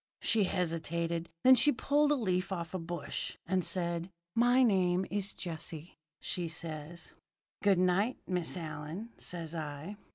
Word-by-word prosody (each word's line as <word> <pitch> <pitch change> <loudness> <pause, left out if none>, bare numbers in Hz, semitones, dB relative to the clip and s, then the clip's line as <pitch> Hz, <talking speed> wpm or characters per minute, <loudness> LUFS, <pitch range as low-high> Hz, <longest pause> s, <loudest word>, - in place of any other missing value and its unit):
"She 220 -3 +3
hesitated. 170 -1 -1
Then 260 - +9
she 275 +4 +5
pulled 290 +3 +2
a - - +5
leaf 185 -7 0
off 170 -3 -3
a 185 - -1
bush, 165 -3 -4
and 185 +1 +1
said: 170 -1 -1 0.2
"'My 245 +2 +5
name 185 -4 +3
is 200 0 -1
Jessie,' 165 -1 -6 0.2
says 165 -1 -4
she. - - -25 0.5
"'Good 200 -2 +4
night, 185 +7 +2
Miss 180 -1 -1
Allyn,' 160 +6 -5
says 170 -2 -5
I. 155 +4 -5
180 Hz, 140 wpm, -32 LUFS, 165-200 Hz, 0.5 s, Then